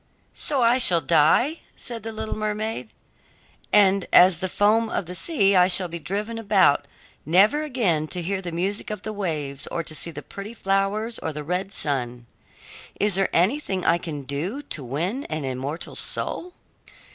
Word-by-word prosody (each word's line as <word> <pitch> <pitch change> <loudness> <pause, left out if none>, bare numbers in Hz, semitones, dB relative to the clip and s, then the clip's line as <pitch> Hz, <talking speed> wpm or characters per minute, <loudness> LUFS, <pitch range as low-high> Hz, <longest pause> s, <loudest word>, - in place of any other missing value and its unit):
"So 275 -4 0
I 235 +2 +4
shall 175 -8 +5
die," 165 - +3 0.2
said 235 -3 -5
the 225 - -6
little 220 0 -5
mermaid, 215 - -3 0.8
"and 200 -2 +4
as 180 -2 +6
the 185 0 -2
foam 215 +4 +2
of 195 - -2
the 180 - -7
sea 200 - +2
I 180 -1 +6
shall 185 0 +2
be 170 0 -6
driven 210 +8 -4
about, 195 -10 +3 0.4
never 200 - +4
again 215 - 0
to 175 +2 -4
hear 190 +2 -2
the 175 -2 -5
music 190 +5 -2
of 210 -3 -5
the 215 - -4
waves 150 -9 -3
or 170 - -3
to 155 - -9
see 155 - +4
the 150 -2 -8
pretty 200 +3 -9
flowers 200 +3 -1
or 160 - -3
the 150 0 -6
red 180 +5 -3
sun? 125 -7 -1 0.7
Is 205 0 +2
there 195 +1 +1
anything 190 - +1
I 170 +1 +3
can 150 -5 -6
do 170 - -4
to 155 - -4
win 170 - -3
an 155 -2 -4
immortal 135 +5 -5
soul?" 360 +1 -3
190 Hz, 175 wpm, -24 LUFS, 160-215 Hz, 0.8 s, as